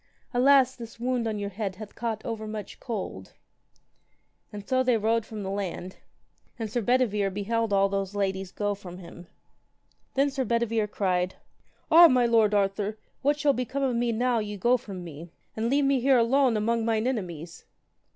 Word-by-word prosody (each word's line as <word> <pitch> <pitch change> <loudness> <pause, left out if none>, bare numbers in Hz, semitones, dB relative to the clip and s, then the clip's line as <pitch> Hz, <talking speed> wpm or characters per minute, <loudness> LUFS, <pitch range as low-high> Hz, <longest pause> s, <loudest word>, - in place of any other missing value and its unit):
Alas, 260 +1 +5
this 230 -1 -10
wound 245 -1 -1
on 215 -1 -2
your 200 0 -4
head 195 -1 -4
hath 210 +1 -10
caught 225 -2 -4
over 220 -2 -4
much 215 -1 -7
cold. 195 - -6 1.2
And 205 -1 -9
so 260 - +1
then - - -1
they - - +3
rowed 225 +1 0
from 215 -2 -6
the 190 - -4
land; 190 -2 -4 0.6
and 225 -3 -4
Sir 240 - 0
Bedivere 215 -4 +2
beheld 220 +3 -1
all 195 0 +4
those 195 0 -3
ladies 190 -2 -2
go 205 -1 -1
from 185 -3 -10
him. 175 -1 -12 0.9
Then 275 +1 +2
Sir 270 -1 -1
Bedivere 230 -2 0
cried, 185 -3 -1 0.6
Ah, 340 +2 +10
my 255 -4 +3
lord 225 -3 +3
Arthur, 200 +1 0 0.2
what 290 +2 +1
shall 290 -1 +3
become 265 +2 -2
of 255 -3 +1
me 235 0 +1
now 240 +1 +1
ye 210 -1 -4
go 240 +6 +3
from 200 -7 -6
me, 165 0 -9 0.3
and 225 +1 -1
leave 280 +2 +2
me 275 -1 +3
here 265 +1 +4
alone 245 0 +3
among 230 +2 0
mine 220 0 0
enemies. 175 - -4
220 Hz, 180 wpm, -27 LUFS, 200-245 Hz, 1.2 s, Ah